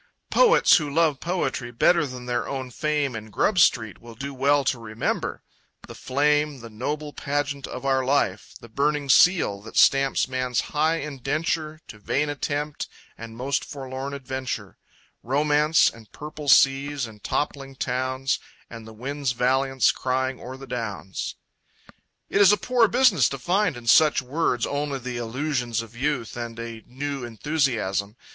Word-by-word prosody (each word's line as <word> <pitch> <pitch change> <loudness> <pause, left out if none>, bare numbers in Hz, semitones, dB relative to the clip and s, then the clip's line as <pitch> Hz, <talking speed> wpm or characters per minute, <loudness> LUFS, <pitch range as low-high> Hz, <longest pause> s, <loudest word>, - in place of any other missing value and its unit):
Poets - - +6
who 150 -3 -2
love 155 -3 +2
poetry 170 -8 -2
better 150 +6 +3
than 125 -1 -8
their 120 0 -2
own 130 -2 -4
fame 150 -2 -1
in 110 0 -7
Grub 185 - +1
Street 110 - +2
will 115 -1 -12
do 140 +4 -6
well 140 +2 +2
to 130 -2 0
remember 115 0 -3 0.4
The - - -9
flame, 145 0 0
the 115 -1 -10
noble 145 +6 -4
pageant 145 -1 -2
of 125 +1 -7
our 135 -1 +2
life; 130 -7 0
The - - -13
burning 145 +4 -1
seal 135 - +4
that 110 - -9
stamps 135 0 +4
man's 130 -2 -1
high 155 +2 +2
indenture 155 +2 -3
To 105 - -11
vain 145 +7 -1
attempt 145 +1 -3 0.3
and 115 0 -10
most 135 +3 -1
forlorn 135 0 -6
adventure; 130 -6 -5 0.5
Romance 150 +4 +3
and 110 -2 -6
purple 150 0 -8
seas, 135 0 +4
and 110 -3 -13
toppling 135 -2 -3
towns, 130 +1 -1 0.3
And 115 -1 -9
the 110 - -11
wind's 135 +3 -3
valiance 130 +2 +2
crying 130 0 -2
o'er 130 +2 -8
the 135 - -10
downs. 105 - -5 0.9
It 200 - +2
is 200 - +8
a 210 - +4
poor 245 0 +3
business 235 - +4
to 135 - -4
find 180 +2 0
in 120 - -11
such 150 +6 +5
words 130 -2 0
only 145 -1 -2
the 125 -1 -5
illusions 120 -1 -2
of 115 0 -14
youth 130 -2 -2
and 120 -1 -6
a 115 -1 -6
new 140 +1 -4
enthusiasm. 115 -6 -1
135 Hz, 155 wpm, -24 LUFS, 120-150 Hz, 0.9 s, is